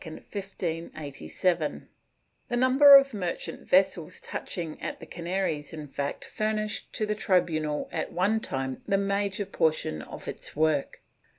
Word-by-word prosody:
^ 165 Hz, -, -3 dB, 0.6 s
The 240 Hz, -, 0 dB
number 270 Hz, +3 st, +8 dB
of 275 Hz, -1 st, +2 dB
merchant 180 Hz, -5 st, -4 dB
vessels 185 Hz, -2 st, +2 dB
touching 165 Hz, -3 st, -5 dB
at -, -, -4 dB
the -, -, -9 dB
Canaries, 170 Hz, -4 st, -3 dB
in 155 Hz, -2 st, -6 dB
fact, 140 Hz, +1 st, -4 dB
furnished 215 Hz, 0 st, -2 dB
to 215 Hz, -, 0 dB
the 210 Hz, -, 0 dB
tribunal 160 Hz, -7 st, +1 dB
at -, -, -3 dB
one 200 Hz, +6 st, +2 dB
time 135 Hz, -8 st, -3 dB
the 195 Hz, -, +3 dB
major 200 Hz, 0 st, 0 dB
portion 155 Hz, -, 0 dB
of -, -, -9 dB
its -, -, -5 dB
work. 155 Hz, -2 st, 0 dB
180 Hz, 130 wpm, -28 LUFS, 155-205 Hz, 0.6 s, number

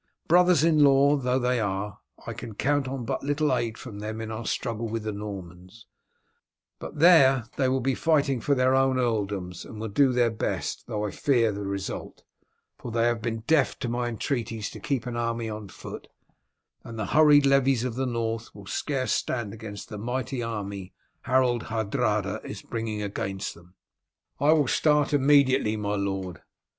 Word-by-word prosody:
Brothers 175 Hz, -2 st, +5 dB
in 155 Hz, -3 st, +5 dB
law 140 Hz, +1 st, +5 dB
though 125 Hz, -2 st, 0 dB
they 125 Hz, -1 st, +1 dB
are 100 Hz, -1 st, -3 dB, 0.3 s
I -, -, -4 dB
can 115 Hz, -3 st, -8 dB
count 145 Hz, +3 st, +1 dB
on 130 Hz, -2 st, -4 dB
but -, -, -2 dB
little 145 Hz, -1 st, +1 dB
aid 115 Hz, -2 st, -2 dB
from 110 Hz, -6 st, -9 dB
them 110 Hz, +1 st, -5 dB
in 110 Hz, 0 st, -5 dB
our 110 Hz, +1 st, -5 dB
struggle 115 Hz, -2 st, -2 dB
with 115 Hz, 0 st, -3 dB
the 110 Hz, -, -2 dB
Normans, 100 Hz, 0 st, -8 dB, 0.9 s
but -, -, -8 dB
there 140 Hz, -6 st, +6 dB
they 130 Hz, -2 st, +1 dB
will 130 Hz, 0 st, +1 dB
be 135 Hz, +2 st, +1 dB
fighting 140 Hz, -5 st, +1 dB
for 140 Hz, +3 st, +2 dB
their 130 Hz, 0 st, +3 dB
own 135 Hz, 0 st, +3 dB
earldoms 100 Hz, -7 st, -2 dB
and 110 Hz, -, -10 dB
will 110 Hz, 0 st, -4 dB
do 130 Hz, +6 st, +3 dB
their 120 Hz, -2 st, +2 dB
best, 110 Hz, -, -3 dB
though 105 Hz, -3 st, -2 dB
I 105 Hz, -, -3 dB
fear 120 Hz, -3 st, +2 dB
the 100 Hz, -1 st, -5 dB
result, 100 Hz, -1 st, -5 dB, 0.6 s
for 120 Hz, -, -7 dB
they 115 Hz, 0 st, +1 dB
have 120 Hz, -1 st, +1 dB
been 115 Hz, 0 st, -3 dB
deaf 145 Hz, +4 st, +2 dB
to 120 Hz, -, -3 dB
my 120 Hz, +1 st, -1 dB
entreaties 115 Hz, -2 st, -3 dB
to -, -, -9 dB
keep 135 Hz, -5 st, -2 dB
an 120 Hz, -1 st, -4 dB
army 115 Hz, -1 st, -2 dB
on 105 Hz, -1 st, -6 dB
foot, -, -, -9 dB, 0.8 s
and 115 Hz, -1 st, -9 dB
the 110 Hz, -, -2 dB
hurried 150 Hz, -2 st, +6 dB
levies 135 Hz, -3 st, +3 dB
of 125 Hz, -2 st, -2 dB
the 130 Hz, +2 st, -2 dB
North 115 Hz, -1 st, -3 dB
will 100 Hz, -1 st, -11 dB
scarce 130 Hz, +4 st, -2 dB
stand 115 Hz, -5 st, -1 dB
against 110 Hz, -2 st, -8 dB
the 105 Hz, -, -6 dB
mighty 125 Hz, +3 st, -3 dB
army 100 Hz, -4 st, -5 dB, 0.3 s
Harold 125 Hz, -2 st, +2 dB
Hardrada 105 Hz, -2 st, -1 dB
is 100 Hz, -, -8 dB
bringing 110 Hz, -2 st, -4 dB
against 100 Hz, -1 st, -4 dB
them." 85 Hz, +2 st, -19 dB, 0.6 s
"I 145 Hz, +2 st, +4 dB
will 150 Hz, -4 st, +2 dB
start 150 Hz, +2 st, +2 dB
immediately, 135 Hz, -5 st, +4 dB
my 105 Hz, -1 st, -2 dB
lord." 95 Hz, -3 st, -3 dB
115 Hz, 180 wpm, -26 LUFS, 105-135 Hz, 0.9 s, there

